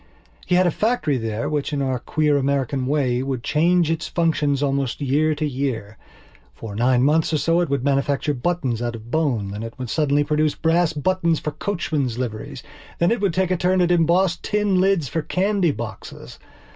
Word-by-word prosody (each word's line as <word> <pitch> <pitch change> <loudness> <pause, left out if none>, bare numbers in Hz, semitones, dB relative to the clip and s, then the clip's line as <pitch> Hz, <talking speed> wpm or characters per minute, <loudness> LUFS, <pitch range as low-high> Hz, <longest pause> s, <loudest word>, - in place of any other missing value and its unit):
He 180 - +2
had 185 +1 +4
a 175 - +3
factory 210 - 0
there 115 +2 -3
which, 150 -1 -2
in 145 - -1
our 130 -2 -1
queer 150 +3 +1
American 135 -1 0
way, 130 -4 +1
would 130 -3 -3
change 165 +2 +2
its 165 0 -2
functions 150 -4 0
almost 135 -3 -1
from 145 - -4
year 150 +3 +2
to 155 +1 -2
year. 125 -6 -3 0.6
For 105 - -8
nine 125 +2 +2
months 155 +4 +2
or - - +3
so 165 +3 +2
it 175 - -1
would 140 -3 -1
manufacture 140 +1 0
buttons 130 -4 -2
out 120 -1 -2
of 115 +1 -11
bone. 125 -11 0
Then 105 +2 -6
it 115 +2 -7
would 125 -3 -5
suddenly 145 -2 +2
produce 150 0 +1
brass 165 +1 +2
buttons 170 +1 0
for 150 - -4
coachmen's 150 - -2
liveries. 115 -4 -5 0.3
Then 170 - +2
it 235 -3 0
would 195 -5 0
take 185 -1 +1
a 185 - +2
turn 185 +2 +1
at 175 -1 +2
embossed 175 +2 +2
tin 205 -3 +1
lids 190 -6 +2
for 160 +7 -2
candy 190 +2 +1
boxes. 115 -8 -7
150 Hz, 195 wpm, -22 LUFS, 130-170 Hz, 0.6 s, had